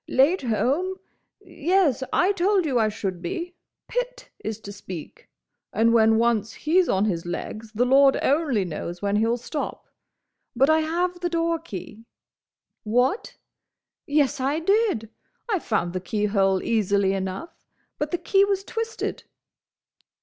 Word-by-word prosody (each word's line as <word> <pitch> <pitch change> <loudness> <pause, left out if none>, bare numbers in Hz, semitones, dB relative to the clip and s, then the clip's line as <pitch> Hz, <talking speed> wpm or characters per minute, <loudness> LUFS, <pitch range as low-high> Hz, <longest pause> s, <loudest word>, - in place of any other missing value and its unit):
"Late 295 +9 +3
home?—Yes; 315 - -1
I 365 +3 +3
told 390 -1 +2
you 260 -5 +1
I 220 -1 +3
should 195 -4 -4
be. 340 - -4 0.3
Pitt - - -4
is 220 0 -4
to 200 - -8
speak, 185 -5 -9 0.4
and 230 +2 +3
when 225 -1 +5
once 225 -2 +1
he's 345 +3 +2
on 195 +2 +2
his 175 -5 -2
legs 215 +5 -5
the 240 +3 +2
Lord 270 +1 +5
only 275 - +2
knows 175 +2 -6
when 200 0 +1
he'll 225 +2 +2
stop. 290 +5 -5 0.7
But 270 +5 +4
I 315 - +4
have 350 +3 -1
the 350 0 -1
doorkey. 330 - -3 0.8
What? 245 - 0 0.7
Yes, 290 -1 +2
I 275 +4 0
did! 390 - +1 0.4
I 415 -5 +1
found 175 - -1
the 185 - -3
keyhole 195 -1 +1
easily 200 -3 +2
enough, 190 - -5 0.4
but 295 - -1
the 350 - -1
key 390 +3 +3
was 395 -1 0
twisted. 455 +2 -4
255 Hz, 135 wpm, -24 LUFS, 210-345 Hz, 0.8 s, when